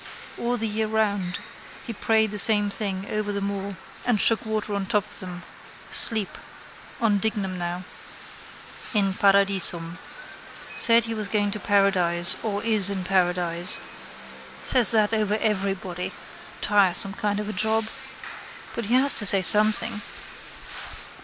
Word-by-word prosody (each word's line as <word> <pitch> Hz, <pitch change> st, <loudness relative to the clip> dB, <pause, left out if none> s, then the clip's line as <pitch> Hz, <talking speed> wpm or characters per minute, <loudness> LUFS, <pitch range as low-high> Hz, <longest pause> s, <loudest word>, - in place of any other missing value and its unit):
All 245 Hz, +1 st, -2 dB
the 225 Hz, -1 st, -2 dB
year 215 Hz, +1 st, -2 dB
round 205 Hz, -4 st, -2 dB, 0.5 s
he 235 Hz, -, -6 dB
prayed 220 Hz, 0 st, 0 dB
the 210 Hz, -, -5 dB
same 205 Hz, -1 st, +1 dB
thing 195 Hz, -3 st, -2 dB
over 215 Hz, -1 st, -3 dB
them 200 Hz, 0 st, -3 dB
all 200 Hz, 0 st, -6 dB, 0.3 s
and 245 Hz, -4 st, 0 dB
shook 225 Hz, +2 st, +3 dB
water 215 Hz, -1 st, -3 dB
on 200 Hz, -1 st, -3 dB
top 210 Hz, -2 st, 0 dB
of -, -, 0 dB
them: 180 Hz, -1 st, -8 dB, 0.5 s
sleep. 220 Hz, -4 st, +1 dB, 0.6 s
On 215 Hz, -4 st, +1 dB
Dignam 195 Hz, -4 st, -3 dB
now. 175 Hz, +1 st, -5 dB, 1.1 s
—In 195 Hz, -2 st, +1 dB
paradisum. 195 Hz, -4 st, +1 dB, 0.7 s
Said 230 Hz, 0 st, +8 dB
he 230 Hz, 0 st, -4 dB
was 215 Hz, -2 st, -3 dB
going 205 Hz, -1 st, -1 dB
to 210 Hz, -, -5 dB
paradise 185 Hz, -4 st, +3 dB
or 210 Hz, -2 st, -4 dB
is 215 Hz, -4 st, +4 dB
in 195 Hz, -2 st, -4 dB
paradise. 180 Hz, -2 st, +1 dB, 0.9 s
Says 245 Hz, -3 st, +5 dB
that 220 Hz, -1 st, +1 dB
over 210 Hz, -1 st, 0 dB
everybody. 195 Hz, -4 st, -2 dB, 0.5 s
Tiresome 195 Hz, -1 st, +2 dB
kind 205 Hz, -1 st, -3 dB
of 210 Hz, -, -5 dB
a 215 Hz, -, -5 dB
job. 220 Hz, +3 st, 0 dB, 0.9 s
But 235 Hz, -, -5 dB
he 235 Hz, +4 st, 0 dB
has 275 Hz, +2 st, +4 dB
to 205 Hz, -, -1 dB
say 195 Hz, -1 st, +6 dB
something. 215 Hz, +2 st, +1 dB
205 Hz, 140 wpm, -23 LUFS, 190-220 Hz, 1.1 s, Said